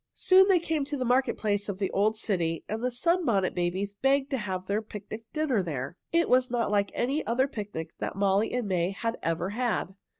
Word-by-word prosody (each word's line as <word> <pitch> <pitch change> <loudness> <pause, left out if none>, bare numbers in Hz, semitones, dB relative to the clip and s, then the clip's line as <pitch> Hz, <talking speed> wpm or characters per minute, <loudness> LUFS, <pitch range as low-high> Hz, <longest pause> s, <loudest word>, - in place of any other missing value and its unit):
Soon 380 +1 +6
they 385 -2 +5
came 320 -3 -1
to 290 +1 -3
the 255 - -2
market 255 +2 +2
place 205 -1 -1
of 195 - -3
the 195 -1 -1
old 215 +2 +2
city, 170 -7 -1
and 220 +2 -4
the 250 - +2
Sunbonnet 245 - +1
Babies 185 +3 -1
begged 270 +6 +1
to 270 - +1
have 185 -3 -4
their 205 +3 0
picnic 215 +1 -8
dinner 305 -9 +1
there. 145 -4 -4 0.2
It 335 0 +3
was 255 0 +3
not 235 -3 0
like 200 -1 +2
any 275 +6 0
other 260 +4 +2
picnic 205 - -6
that - - -3
Molly 200 +2 +2
and 245 -3 -1
May 180 -2 +1
had 230 +4 -3
ever 165 +2 -1
had. 235 -4 -1
215 Hz, 210 wpm, -28 LUFS, 195-260 Hz, 0.2 s, Soon